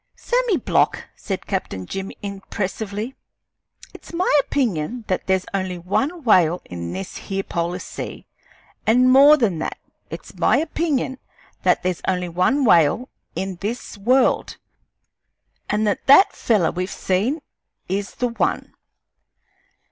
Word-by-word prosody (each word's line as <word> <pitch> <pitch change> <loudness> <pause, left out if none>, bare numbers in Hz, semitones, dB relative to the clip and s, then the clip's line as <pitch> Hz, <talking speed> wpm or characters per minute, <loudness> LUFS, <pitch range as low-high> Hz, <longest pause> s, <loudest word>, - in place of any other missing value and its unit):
"Sammy 485 -6 +1
Block," - - +1
said 195 -2 -5
Captain 100 - -3
Jim, 195 - -5
impressively, 205 +3 -4 0.8
"it's - - -12
my 340 -2 +1
opinion 230 - -1
that 185 - -2
there's 190 0 +1
only 190 -2 -2
one 275 - -1
whale 180 -7 +4
in 85 -1 -6
this 95 +2 -6
here 195 0 -3
polar 170 0 -2
sea; - - -7 0.6
an', 250 +3 +5
more 280 +4 +8
than 205 - 0
that, - - -3 0.3
it's - - -9
my - - +3
opinion 305 -5 -1 0.4
that - - +2
there's 180 -1 -1
only 180 -1 0
one 185 +12 +2
whale 175 - +4 0.3
in 190 -1 -3
this 220 +7 -5
world, 250 +6 +2 1.1
an' 210 +1 +1
that 205 -2 -1
that 285 +9 +7
feller 210 -8 +1
we've 180 +2 -3
seen 205 - 0 0.5
is 195 +2 -3
the 245 - 0
one! 230 - -1
200 Hz, 130 wpm, -22 LUFS, 180-255 Hz, 1.1 s, more